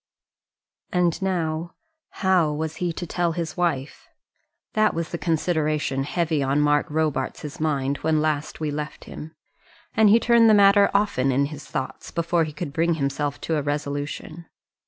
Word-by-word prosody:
And 175 Hz, -1 st, +1 dB
now 170 Hz, -3 st, -2 dB, 0.3 s
how 185 Hz, -5 st, +2 dB
was 160 Hz, +1 st, -4 dB
he 175 Hz, -1 st, -1 dB
to 175 Hz, -, -5 dB
tell 170 Hz, -1 st, -1 dB
his 165 Hz, -2 st, -4 dB
wife? 160 Hz, -6 st, -2 dB, 0.7 s
That 215 Hz, 0 st, +2 dB
was 165 Hz, 0 st, -2 dB
the 170 Hz, -, -4 dB
consideration 155 Hz, -5 st, 0 dB
heavy 160 Hz, -1 st, 0 dB
on 135 Hz, +1 st, +1 dB
Mark 145 Hz, 0 st, +2 dB
Robarts' 150 Hz, -1 st, -2 dB
mind 140 Hz, -3 st, 0 dB
when 160 Hz, -1 st, +1 dB
last 150 Hz, -1 st, -1 dB
we 155 Hz, -2 st, -2 dB
left 150 Hz, 0 st, -5 dB
him; 160 Hz, +1 st, -9 dB, 0.6 s
and 220 Hz, -2 st, +5 dB
he 225 Hz, +3 st, +6 dB
turned 235 Hz, -1 st, +5 dB
the 215 Hz, -, +7 dB
matter 200 Hz, 0 st, +6 dB
often 200 Hz, -10 st, +1 dB
in 140 Hz, +2 st, +2 dB
his 145 Hz, -1 st, -9 dB
thoughts 130 Hz, -, -5 dB
before 170 Hz, 0 st, 0 dB
he 155 Hz, -, -6 dB
could 150 Hz, -1 st, -6 dB
bring 165 Hz, +1 st, +1 dB
himself 140 Hz, 0 st, -2 dB
to 160 Hz, -, -1 dB
a -, -, 0 dB
resolution. 145 Hz, +3 st, -4 dB
160 Hz, 160 wpm, -24 LUFS, 145-175 Hz, 0.7 s, the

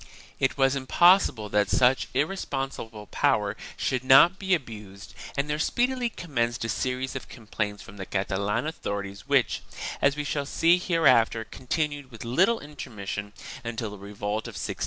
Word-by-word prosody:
It 135 Hz, +1 st, +1 dB
was 135 Hz, 0 st, +3 dB
impossible 140 Hz, -, +4 dB
that 105 Hz, -1 st, +2 dB
such 130 Hz, +1 st, +3 dB
irresponsible 135 Hz, -, -3 dB
power 105 Hz, -1 st, +1 dB, 0.2 s
should 130 Hz, -1 st, -1 dB
not 135 Hz, +9 st, +7 dB
be 190 Hz, -2 st, +2 dB
abused 105 Hz, -, -9 dB, 0.2 s
and 140 Hz, +1 st, 0 dB
there 150 Hz, 0 st, -2 dB
speedily 245 Hz, +7 st, +1 dB
commenced 120 Hz, -, -2 dB
a -, -, -3 dB
series 130 Hz, +4 st, -2 dB
of 135 Hz, -, -6 dB
complaints 105 Hz, -3 st, -4 dB
from 100 Hz, -, -13 dB
the 95 Hz, -, -6 dB
Catalan 100 Hz, +4 st, -1 dB
authorities 100 Hz, -10 st, -5 dB
which, -, -, +2 dB, 0.4 s
as 140 Hz, 0 st, +3 dB
we 150 Hz, -, -3 dB
shall 145 Hz, -1 st, -2 dB
see 170 Hz, +4 st, +3 dB
hereafter, 160 Hz, -11 st, +3 dB
continued 145 Hz, +3 st, -3 dB
with 115 Hz, -2 st, -10 dB
little 190 Hz, -, +3 dB
intermission 105 Hz, -8 st, -6 dB, 0.3 s
until 115 Hz, -2 st, -4 dB
the 105 Hz, -, -9 dB
revolt 105 Hz, +2 st, -4 dB
of -, -, -9 dB
1640. -, -, -4 dB
125 Hz, 155 wpm, -26 LUFS, 105-150 Hz, 0.4 s, not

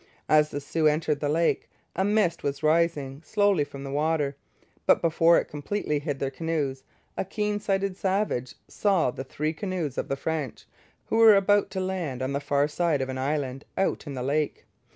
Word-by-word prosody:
As 150 Hz, 0 st, +4 dB
the 145 Hz, -, -4 dB
Sioux 155 Hz, +2 st, +1 dB
entered 150 Hz, -1 st, +1 dB
the 145 Hz, -, -1 dB
lake, 165 Hz, +3 st, +1 dB, 0.3 s
a 190 Hz, -, +1 dB
mist 205 Hz, -4 st, +2 dB
was 140 Hz, +1 st, -3 dB
rising 155 Hz, -3 st, +1 dB
slowly 205 Hz, -6 st, +2 dB
from 140 Hz, -1 st, -9 dB
the 135 Hz, -, -6 dB
water; 150 Hz, -1 st, 0 dB, 0.5 s
but -, -, +6 dB
before 165 Hz, 0 st, +4 dB
it -, -, +1 dB
completely 150 Hz, +1 st, -2 dB
hid 145 Hz, -1 st, -3 dB
their 135 Hz, 0 st, -2 dB
canoes 145 Hz, -3 st, -2 dB, 0.3 s
a -, -, -1 dB
keen 210 Hz, +2 st, -2 dB
sighted 195 Hz, -2 st, -1 dB
savage 190 Hz, -10 st, -1 dB
saw 190 Hz, -10 st, +1 dB
the 130 Hz, -, -6 dB
three 150 Hz, +4 st, -3 dB
canoes 170 Hz, -5 st, -3 dB
of -, -, -3 dB
the 135 Hz, -, -1 dB
French, 155 Hz, -4 st, -3 dB, 0.4 s
who -, -, -1 dB
were 225 Hz, -2 st, +8 dB
about 200 Hz, +1 st, +3 dB
to 190 Hz, 0 st, -4 dB
land 175 Hz, -9 st, -3 dB
on 130 Hz, +1 st, -2 dB
the 140 Hz, -, 0 dB
far 145 Hz, 0 st, +1 dB
side 160 Hz, -1 st, 0 dB
of 130 Hz, -, -5 dB
an 130 Hz, 0 st, -4 dB
island 135 Hz, -1 st, -2 dB
out 190 Hz, -4 st, 0 dB
in 140 Hz, -, -5 dB
the 125 Hz, -, -3 dB
lake. 145 Hz, +2 st, -1 dB
155 Hz, 195 wpm, -26 LUFS, 140-185 Hz, 0.5 s, were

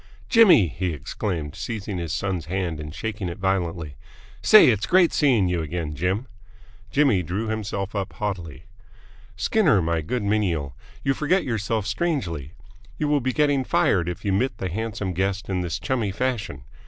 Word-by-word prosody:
"Jimmy!" 215 Hz, -, +7 dB
he 90 Hz, +3 st, -3 dB
exclaimed, 80 Hz, 0 st, -4 dB
seizing 105 Hz, -5 st, -4 dB
his 85 Hz, -3 st, -4 dB
son's 95 Hz, -2 st, -2 dB
hand 90 Hz, -3 st, -2 dB
and 75 Hz, 0 st, -6 dB
shaking 105 Hz, +1 st, -4 dB
it 85 Hz, -, -6 dB
violently. 90 Hz, -5 st, -1 dB, 0.5 s
"Say, 215 Hz, -10 st, +8 dB
it's 105 Hz, -3 st, +1 dB
great 180 Hz, -2 st, +4 dB
seeing 125 Hz, -, +3 dB
you 90 Hz, -2 st, 0 dB
again, 80 Hz, -1 st, -4 dB
Jim!" 95 Hz, -, -1 dB, 0.6 s
Jimmy 140 Hz, -10 st, +3 dB
drew 95 Hz, +7 st, -3 dB
himself 105 Hz, -2 st, -3 dB
up 100 Hz, -2 st, -3 dB
haughtily. 90 Hz, -9 st, -5 dB, 0.7 s
"Skinner, 150 Hz, -, +3 dB
my 85 Hz, -1 st, 0 dB
good 115 Hz, +9 st, -2 dB
menial, 90 Hz, -10 st, 0 dB, 0.3 s
you 135 Hz, -, +2 dB
forget 165 Hz, +7 st, +1 dB
yourself 110 Hz, -3 st, -1 dB
strangely! 100 Hz, -, -2 dB, 0.4 s
You 150 Hz, -, -1 dB
will 145 Hz, -1 st, +2 dB
be 130 Hz, +1 st, 0 dB
getting 145 Hz, -2 st, +2 dB
fired 90 Hz, -7 st, +2 dB
if 90 Hz, +4 st, -7 dB
you 100 Hz, -, +1 dB
mitt 110 Hz, +2 st, 0 dB
the 95 Hz, -, -3 dB
handsome 105 Hz, -1 st, -3 dB
guest 95 Hz, +3 st, -2 dB
in 95 Hz, -1 st, 0 dB
this 90 Hz, -1 st, -2 dB
chummy 105 Hz, +4 st, -1 dB
fashion!" 105 Hz, -, -3 dB
100 Hz, 165 wpm, -24 LUFS, 85-115 Hz, 0.7 s, Say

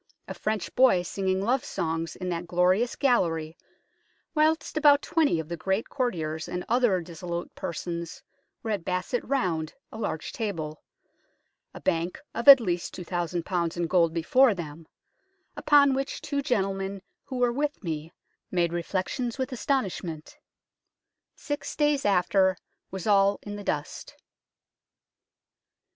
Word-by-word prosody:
a -, -, -5 dB
French 215 Hz, -4 st, -3 dB
boy 245 Hz, -9 st, +5 dB
singing 190 Hz, +1 st, -1 dB
love 255 Hz, +5 st, +1 dB
songs, 165 Hz, -, -3 dB
in 180 Hz, -1 st, -4 dB
that 175 Hz, 0 st, -3 dB
glorious 185 Hz, +7 st, +2 dB
gallery, 165 Hz, -, +1 dB, 0.8 s
whilst 315 Hz, 0 st, +1 dB
about 290 Hz, -2 st, +5 dB
twenty 305 Hz, -, +2 dB
of 160 Hz, -, -5 dB
the 170 Hz, -, -4 dB
great 190 Hz, +6 st, -1 dB
courtiers 160 Hz, -, -2 dB
and 180 Hz, 0 st, -4 dB
other 235 Hz, -6 st, +3 dB
dissolute 170 Hz, +1 st, -6 dB
persons 170 Hz, 0 st, -5 dB, 0.4 s
were 225 Hz, -, -2 dB
at 200 Hz, -5 st, -2 dB
basset 185 Hz, +7 st, -2 dB
round 175 Hz, -, -1 dB, 0.2 s
a 220 Hz, -, -8 dB
large 160 Hz, -7 st, -3 dB
table, 160 Hz, -9 st, -4 dB, 0.9 s
a -, -, -10 dB
bank 170 Hz, -1 st, -1 dB
of 235 Hz, -, -4 dB
at 275 Hz, -1 st, +12 dB
least 175 Hz, -6 st, -2 dB
2000 175 Hz, -1 st, -3 dB, 0.3 s
in 175 Hz, -, 0 dB
gold 170 Hz, -1 st, +3 dB
before 220 Hz, +9 st, +4 dB
them; 160 Hz, -2 st, -8 dB, 0.7 s
upon 285 Hz, -2 st, +5 dB
which 270 Hz, +1 st, -2 dB
two 285 Hz, -1 st, -2 dB
gentlemen 195 Hz, -5 st, -1 dB, 0.2 s
who 260 Hz, -, -5 dB
were 245 Hz, -1 st, +2 dB
with 290 Hz, -1 st, -2 dB
me 160 Hz, -2 st, -4 dB, 0.4 s
made 170 Hz, -2 st, +1 dB
reflections 190 Hz, +8 st, -2 dB
with 260 Hz, +1 st, -2 dB
astonish 255 Hz, -5 st, -1 dB
ment. 160 Hz, -3 st, -8 dB, 1.0 s
Six 290 Hz, 0 st, -5 dB
days 295 Hz, -2 st, +2 dB
after 190 Hz, -1 st, +3 dB, 0.3 s
was 190 Hz, -2 st, -6 dB
all 200 Hz, -1 st, +4 dB
in 205 Hz, 0 st, -6 dB
the 205 Hz, -, -7 dB
dust." 150 Hz, -5 st, -4 dB
190 Hz, 135 wpm, -27 LUFS, 170-245 Hz, 1.0 s, at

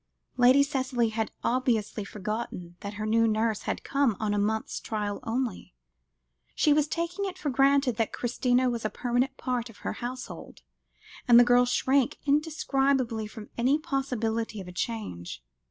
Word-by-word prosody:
Lady 255 Hz, +3 st, +6 dB
Cicely 255 Hz, -4 st, 0 dB
had 220 Hz, 0 st, -2 dB
obviously 235 Hz, -4 st, 0 dB
forgotten 200 Hz, -3 st, -5 dB
that 200 Hz, 0 st, -6 dB
her 215 Hz, +1 st, -4 dB
new 230 Hz, +1 st, +3 dB
nurse 220 Hz, -1 st, 0 dB
had -, -, -2 dB
come 275 Hz, -7 st, +1 dB
on 215 Hz, -1 st, 0 dB
a 205 Hz, -, +1 dB
month's 220 Hz, +2 st, -1 dB
trial 210 Hz, -2 st, -3 dB
only; 230 Hz, -, -3 dB, 0.8 s
she 300 Hz, -, +4 dB
was 300 Hz, 0 st, +2 dB
taking 340 Hz, +5 st, -2 dB
it 375 Hz, -1 st, -5 dB
for 300 Hz, -6 st, -2 dB
granted 275 Hz, -2 st, +3 dB
that 225 Hz, -, 0 dB
Christina 250 Hz, +1 st, +1 dB
was 235 Hz, -2 st, -2 dB
a 215 Hz, -, 0 dB
permanent 245 Hz, +3 st, -1 dB
part 245 Hz, -2 st, -2 dB
of 225 Hz, -, -15 dB
her -, -, -1 dB
household, 250 Hz, +1 st, -7 dB, 0.6 s
and 240 Hz, -1 st, +8 dB
the -, -, +9 dB
girl 245 Hz, 0 st, +5 dB
shrank 265 Hz, +1 st, +2 dB
indescribably 275 Hz, -6 st, +1 dB
from 215 Hz, 0 st, -11 dB
any 260 Hz, +5 st, +3 dB
possibility 230 Hz, -7 st, -2 dB
of 190 Hz, -, -8 dB
a -, -, -7 dB
change. 180 Hz, -, -5 dB
240 Hz, 160 wpm, -28 LUFS, 220-270 Hz, 0.8 s, the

